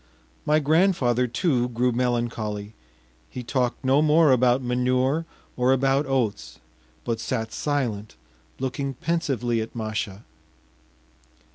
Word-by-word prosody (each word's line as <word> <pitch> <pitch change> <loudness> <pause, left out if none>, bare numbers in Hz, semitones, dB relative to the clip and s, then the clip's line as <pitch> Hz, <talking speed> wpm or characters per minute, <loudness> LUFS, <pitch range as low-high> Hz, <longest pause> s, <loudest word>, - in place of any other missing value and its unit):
My 150 +1 +4
grandfather, 150 -6 +2
too, 125 -1 0
grew 125 +1 +1
melancholy; 115 -4 -2 0.6
he 125 - -7
talked 125 +2 -1
no 135 +3 +4
more 155 -1 +5
about 125 0 +3
manure 130 +5 +1 0.3
or 125 +1 +2
about 135 +2 +2
oats, 130 -6 -1 0.5
but 115 -1 -1
sat 115 -1 -3
silent, 120 - -2 0.4
looking 135 +1 -3
pensively 125 -7 -1
at 110 - -7
Masha. 110 -2 -4
125 Hz, 110 wpm, -24 LUFS, 115-140 Hz, 0.6 s, more